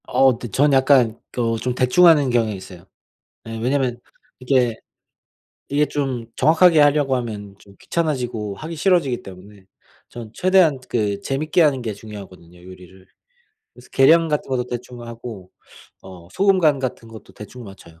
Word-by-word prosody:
어 135 0 +4
근데 120 +1 -7
저는 140 +7 +2
약간 130 -4 +3
또 115 -2 -1
좀 125 +2 -3
대충 130 +8 +4
하는 150 -5 +5
경향이 115 -4 0
있어요. 95 -1 -12 0.6
예 115 0 -6
왜냐면 125 0 -1 0.4
이게, 125 -3 +1 0.9
이게 145 +1 +1
좀 135 -6 -3
정확하게 160 +3 +4
하려고 145 -2 +3
하면 105 -5 -6
좀 100 0 -19
귀찮아지고 125 -10 -3
하기 160 +6 -7
싫어지기 155 -8 +1
때문에 95 +1 -14 0.4
저는 115 -3 -10
최대한 185 -6 +3
그 105 -4 -1
재밌게 155 +5 0
하는 140 -5 +1
게 110 -3 -4
중요하거든요, 95 -5 -13
요리를. 95 +1 -15 0.7
그래서 - - -18
계량 165 +5 +5
같은 150 -1 -2
것도 130 -2 -1
대충 125 0 -8
하고 115 -5 -9 0.5
어 90 -3 -13
소금 195 0 +2
간 155 -5 +3
같은 130 -3 -5
것도 110 -1 -14
대충 120 +4 -11
맞춰요. 95 -5 -15
125 Hz, 330 characters per minute, -20 LUFS, 105-145 Hz, 0.9 s, 하는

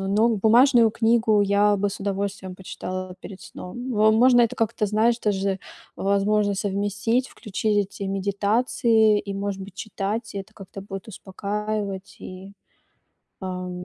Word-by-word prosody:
но 200 +4 +2
бумажную 230 +2 +5
книгу 225 -1 +3
я 205 +1 +3
бы 200 +1 0
с 195 - -8
удовольствием 195 -1 -3
почитала 185 0 -6
перед 195 -1 -10
сном. 245 +8 -7
Во 215 -1 +4
можно 245 +2 +5
это 230 - +1
как-то, 220 -2 0
знаешь, 220 +3 +2
тоже, 195 -3 0 0.4
возможно, 200 +1 +1
совместить, 205 +5 -1
включить 210 -1 -2 0.2
эти 200 - -5
медитации 210 +3 +2
и, 200 - -3
может 200 0 -3
быть, 190 -1 -11
читать. 215 +3 -4
И - - -3
это 195 - -9
как-то 195 0 -10
будет 195 +1 -8
успокаивать 200 0 -4
и, 185 +2 -9 0.9
эм, 180 -1 -5
205 Hz, 140 wpm, -24 LUFS, 195-220 Hz, 0.9 s, бумажную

